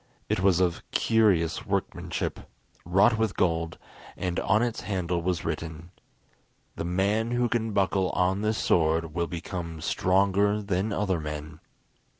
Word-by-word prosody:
It - - +1
was 95 -2 +3
of 90 -2 +1
curious 95 -8 +2
workmanship, - - -2 0.5
wrought 100 +6 +4
with 110 -5 0
gold, 85 -2 0 0.4
and 90 -2 -2
on 110 +3 +2
its 120 -2 -2
handle 90 -4 -2
was 90 -1 -1
written: 80 +1 -5 0.8
"The - - -4
man 100 +6 +1
who 120 0 +1
can 115 -1 -1
buckle 95 -2 +1
on 95 +2 +1
this 110 +1 0
sword 80 -1 +1
will 85 0 -1
become 85 -1 -5
stronger 100 +4 +2
than 100 +1 -1
other 100 -4 0
men." 75 0 -6
90 Hz, 140 wpm, -27 LUFS, 85-105 Hz, 0.8 s, wrought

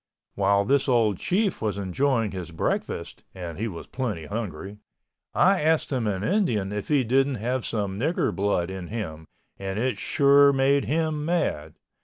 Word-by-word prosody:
While 100 0 +2
this 140 +4 +2
old 110 -6 +2
Chief 200 +1 0
was 105 -3 -1
enjoying 110 +3 0
his 90 -2 -6
breakfast 80 - -3
(and 85 -2 -7
he 115 - -1
was 85 -6 -7
plenty 110 -12 -4
hungry) 100 -1 -5 0.6
I 190 -1 +4
asked 160 0 +1
him 125 -5 0
in 100 -2 -2
Indian 120 - +1
if 105 -1 -4
he 145 -3 +3
didn't 135 +3 +2
have 125 +3 -2
some 100 -3 -2
Nigger 160 +8 0
blood 95 -3 0
in 95 -2 -6
him, 80 -8 -6 0.3
and 95 0 -4
it 120 -2 -1
sure 140 0 +5
made 140 +1 +2
him 155 -1 0
mad. 115 - -1
110 Hz, 165 wpm, -25 LUFS, 95-140 Hz, 0.6 s, sure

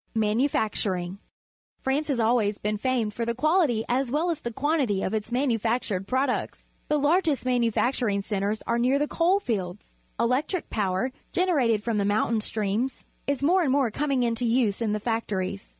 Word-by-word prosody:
Manufacturing. 210 -5 0 0.3
— - - -51
France 275 +3 0
has 275 -5 0
always 220 -3 +2
been 210 0 -2
famed 240 -4 0
for 235 - -3
the 235 0 -1
quality 300 -5 +2
as 255 +1 0
well 315 +7 +1
as 315 -2 -4
the 235 - -4
quantity 270 -6 0
I - - +1
if 190 - -4
its 220 +1 -3
manufactured 230 -6 0
products. 260 0 -1 0.2
The 300 - +2
largest 295 -2 +2
manufacturing 240 -3 +1
centres 205 +1 -2
are 235 0 0
near 255 +3 +3
the 295 +1 0
coal 360 +6 +2
lields. 195 -4 -4 0.2
Electric 260 +10 0
power, 195 +3 0 0.2
generated 270 - +2
from 225 -3 0
the - - +1
mountain 215 +2 +1
streams, 215 +5 -2 0.2
is 280 -1 -1
more 365 +6 +4
and 290 -6 +1
more 265 -4 +2
coming 275 +1 0
into 235 0 0
use 230 -3 +1
in 220 -2 0
the 215 - -1
factories. 200 -4 -3
235 Hz, 175 wpm, -26 LUFS, 210-275 Hz, 0.3 s, more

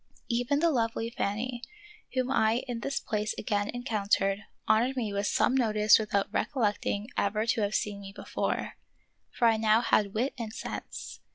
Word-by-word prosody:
Even 245 +4 +1
the 335 -1 +4
lovely 230 -2 -1
Fanny, 235 +2 -2 0.5
whom 255 0 0
I 225 -1 +2
in 240 -2 -3
this 275 +3 -2
place 215 -2 -2
again 205 0 -1
encountered, 205 -5 0 0.3
honored 245 +5 +3
me 220 -5 -1
with 200 +1 0
some - - +2
notice 215 -5 +5
without 205 -1 -1
recollecting 210 -5 0
ever 210 +2 +1
to 230 -1 +1
have 205 +1 0
seen 205 -1 -1
me 195 0 -8
before; - - -3 0.5
for 235 - +2
I 225 -1 +4
now 220 +1 +4
had 210 -4 +2
wit 250 +6 0
and 225 -2 -4
sense. - - -6
220 Hz, 165 wpm, -29 LUFS, 205-245 Hz, 0.5 s, notice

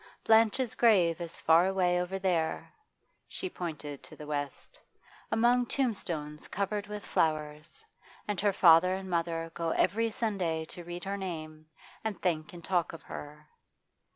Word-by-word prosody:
Blanche's 225 +2 +4
grave 180 -8 +4
is 170 -1 -6
far 165 +3 +5
away 180 -2 +2
over 180 +2 -3
there' 175 -4 -1 0.5
she 375 - -4
pointed 150 -5 -6
to - - -12
the 150 - -9
west 145 -2 -5 0.5
'among 240 +2 +4
tombstones 170 - -2
covered 200 +1 -2
with 210 0 -6
flowers, 155 - -1 0.4
and 205 -3 -1
her 205 - +4
father 185 -1 +6
and 190 -1 -6
mother 165 -1 -1
go 165 -1 -2
every 225 +7 +2
Sunday 185 -8 -1
to 175 +2 -9
read 175 +1 -7
her 200 0 -3
name, 155 -5 -6 0.4
and 220 -3 -3
think 160 -4 -1
and 175 -1 -11
talk 175 -3 0
of 165 - -10
her. 150 +1 -9
175 Hz, 150 wpm, -30 LUFS, 160-200 Hz, 0.5 s, father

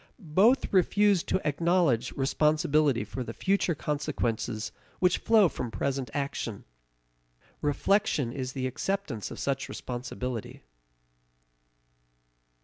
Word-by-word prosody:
Both 230 - +4
refuse 200 +1 +4
to 185 - -1
acknowledge 150 -5 +2
responsibility 150 -1 +2
for 130 - -5
the 115 -1 -7
future 190 -3 +1
consequences 120 -7 -2 0.3
which 180 -1 +2
flow 220 -4 +5
from 125 -6 -4
present 135 +1 -2
action. 140 -6 -4 1.0
Reflection 150 - +1
is 130 -1 -4
the 130 -2 -3
acceptance 130 - -3
of - - -8
such 140 0 -2
responsibility. 125 -1 -5
145 Hz, 100 wpm, -28 LUFS, 125-180 Hz, 1.0 s, flow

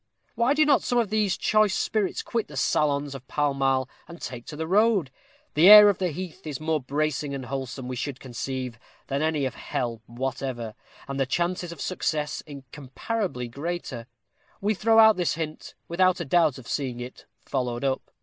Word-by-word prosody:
Why 240 +5 +2
do 305 +1 +4
not 290 -2 +4
some 245 - 0
of 225 -4 +1
these 210 -3 +1
choice 215 -2 +3
spirits 210 -4 -1
quit 230 -2 -2
the 145 - -10
salons 145 0 +1
of 130 -1 -10
Pall 145 -1 0
Mall, 135 -1 +1 0.2
and 170 0 -11
take 120 -2 -7
to 150 - -7
the 160 +2 -3
road? 195 - +3 0.4
the 165 +6 +6
air 210 0 +11
of 200 - 0
the 185 - +1
heath 180 +1 -7
is 145 -4 -4
more 155 -1 0
bracing 145 +1 -1
and 130 -2 -6
wholesome, 130 -1 -5
we 130 - -4
should 130 +1 -4
conceive, 130 -1 -5 0.3
than 140 - -2
that 155 - +2
of 160 - -1
any 145 - 0
"hell" 120 -2 -3
whatever, 120 -2 -4 0.3
and 140 0 -4
the 135 - +1
chances 175 +4 -1
of 170 - -10
success 155 -5 -2
incomparably 140 - -5
greater. 140 -2 -5 0.5
We 210 +2 +1
throw 225 +2 +2
out 220 -2 +7
this 175 -4 0
hint, 155 -1 -6
without 185 +2 +2
a 170 - -3
doubt 155 -1 +3
of 130 - -12
seeing 130 -4 -2
it 125 +1 -9 0.2
followed 125 -2 -2
up. 135 -1 -1
150 Hz, 190 wpm, -26 LUFS, 130-185 Hz, 0.5 s, air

